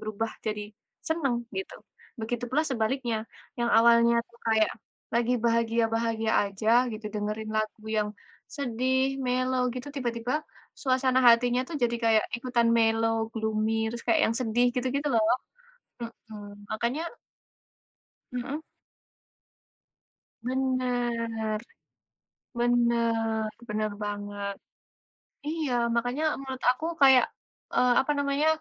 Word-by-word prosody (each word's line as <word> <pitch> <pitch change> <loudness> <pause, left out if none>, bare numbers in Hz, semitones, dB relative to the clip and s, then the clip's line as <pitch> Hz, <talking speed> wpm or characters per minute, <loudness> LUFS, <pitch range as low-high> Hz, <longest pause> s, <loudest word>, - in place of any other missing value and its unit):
berubah 215 +1 -3 0.2
jadi, 210 -1 -1 0.4
seneng, 275 -8 0
gitu. 385 - -4 0.5
Begitu 240 +2 -2
pula 300 +4 +3
sebaliknya, 240 -2 -1 0.4
yang 235 0 +1
awalnya 235 0 +6
tu 235 - -26
kayak, 220 -1 +3 0.4
lagi 235 +1 +2
bahagia-bahagia 230 -1 +1
aja 200 +2 -4 0.2
gitu, 215 0 -6
dengerin 215 +1 -3
lagu 215 0 -2
yang 215 -1 0 0.4
sedih, 260 0 0
mellow, 255 0 +1
gitu, 255 +3 -6
tiba-tiba, 240 0 -2 0.4
suasana 260 -1 +2
hatinya 245 +1 +5
tuh, 325 - -4
jadi, 235 0 +2
kayak 220 -1 +4 0.2
ikutan 240 -2 +2
mellow, 225 0 +3 0.2
gloomy, 220 0 0
terus, 235 - -5
kayak 230 - +4
yang - - -1
sedih 240 +1 +2
gitu-gitu 275 +4 0
loh. 225 - +5 1.1
Hmm, 205 -1 -10
makanya 235 +8 -1 1.3
Heeh. 270 +5 -3 1.8
Bener, 240 -4 -1 1.0
bener, 230 -2 +2 0.2
bener 215 0 -1
banget. 205 -1 -4 0.9
Iya, 310 -4 -2 0.2
makanya 245 +6 0 0.2
menurut 265 -1 -6
aku, 255 +6 0 0.2
kayak, 265 -2 +7 0.5
eee, 250 0 +4
apa 295 - -1
namanya, 285 +2 +1
235 Hz, 105 wpm, -28 LUFS, 220-255 Hz, 1.8 s, kayak